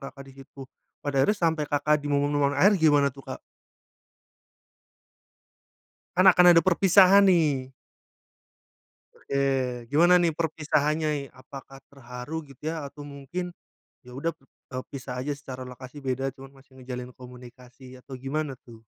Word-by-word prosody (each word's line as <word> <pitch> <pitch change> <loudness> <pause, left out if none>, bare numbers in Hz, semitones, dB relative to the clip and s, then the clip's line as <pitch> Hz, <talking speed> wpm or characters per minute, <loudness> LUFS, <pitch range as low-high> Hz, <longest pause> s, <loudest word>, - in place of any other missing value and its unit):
Kakak 135 0 -10
disitu. 135 0 -13 0.3
Pada 145 -1 -4
akhirnya 210 - +1
sampe 165 -4 0
Kakak 145 +1 +1
di 145 - -2
momen-momen 145 0 +1
akhir 195 +9 +4
gimana 145 -4 +4
tuh, 135 0 -13
Kak? 130 - -7 2.8
Kan 185 +1 +7
akan 180 0 +5
ada 165 - +5
perpisahan 195 +2 +5
nih. 155 -8 +2 1.5
Oke, 130 -3 -2
gimana 175 +5 +5
nih 170 -2 +1
perpisahannya 150 -2 -1
apakah 135 +1 -13
terharu 135 +4 -8
gitu 135 +3 -12
ya? 160 -1 -3
Atau 145 +1 -9
mungkin 145 +6 -6 0.5
ya - - -12
udah 165 +4 -1
p - - -54 0.3
e - - -3
pisah 135 -2 -7
aja 145 - -4
secara 130 -3 -8
lokasi 130 +3 -11
beda, 135 0 -2
cuman 135 0 -13
masih 135 0 -22
menjalin 125 -1 -7
komunikasi 125 +1 -14
atau 130 - -11
gimana 135 0 -4
tuh? 115 -2 -15
140 Hz, 135 wpm, -26 LUFS, 130-155 Hz, 2.8 s, Kan